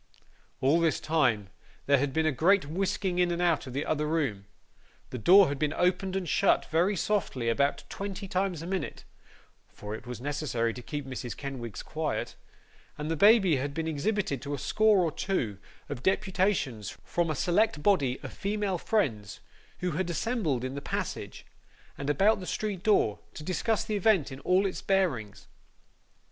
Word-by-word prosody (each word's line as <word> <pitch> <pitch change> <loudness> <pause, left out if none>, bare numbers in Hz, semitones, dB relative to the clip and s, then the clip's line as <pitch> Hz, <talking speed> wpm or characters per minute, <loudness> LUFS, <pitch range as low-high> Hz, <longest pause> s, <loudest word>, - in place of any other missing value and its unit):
All 140 +6 +4
this 165 -4 +2
time 125 -11 +1 0.3
there 140 -1 +4
had 140 +1 0
been 160 +3 +1
a 155 - +3
great 175 +7 +3
whisking 185 +3 -1
in 180 -1 +3
and 170 0 -2
out 170 -6 +1
of 130 - -7
the 140 +3 -2
other 150 -1 0
room; 135 -12 -1 0.6
the 125 - -4
door 190 - +7
had 140 -1 -3
been 150 0 0
opened 185 +1 0
and 190 -2 -2
shut 195 - +3
very 175 +6 +2
softly 165 - -1
about 140 +5 +1
twenty 200 0 -5
times 185 -3 -1
a - - -6
minute 185 -3 -4 0.7
(for 105 0 -8
it 110 - -8
was 125 -2 -6
necessary 130 -4 -1
to 125 - -8
keep 145 +3 -5
Mrs. 125 -3 -6
Kenwigs 125 -6 -6
quiet); - - -3 0.6
and 150 +2 -3
the - - +1
baby 195 - +5
had 140 +2 -3
been 160 0 -2
exhibited 160 - -1
to 145 0 -3
a - - -6
score 215 +6 +3
or 165 - 0
two 120 - -2 0.3
of 140 -4 -5
deputations 190 - 0
from 175 -1 -1
a 155 - -1
select 175 +1 +1
body 140 -11 +2
of - - -7
female 200 -2 -2
friends, 115 - -1 0.4
who 180 0 0
had 175 +3 -2
assembled 170 - -1
in 130 0 -3
the 140 - -5
passage, - - -5 0.5
and 140 +1 -4
about 200 +9 +3
the 185 - -7
street 205 -4 -3
door, 180 - +2 0.2
to 150 - -7
discuss 185 +6 0
the 215 - -2
event 195 -8 +3
in 135 - -7
all 185 +6 +2
its 190 - -3
bearings. 125 - 0
160 Hz, 180 wpm, -29 LUFS, 135-190 Hz, 0.7 s, door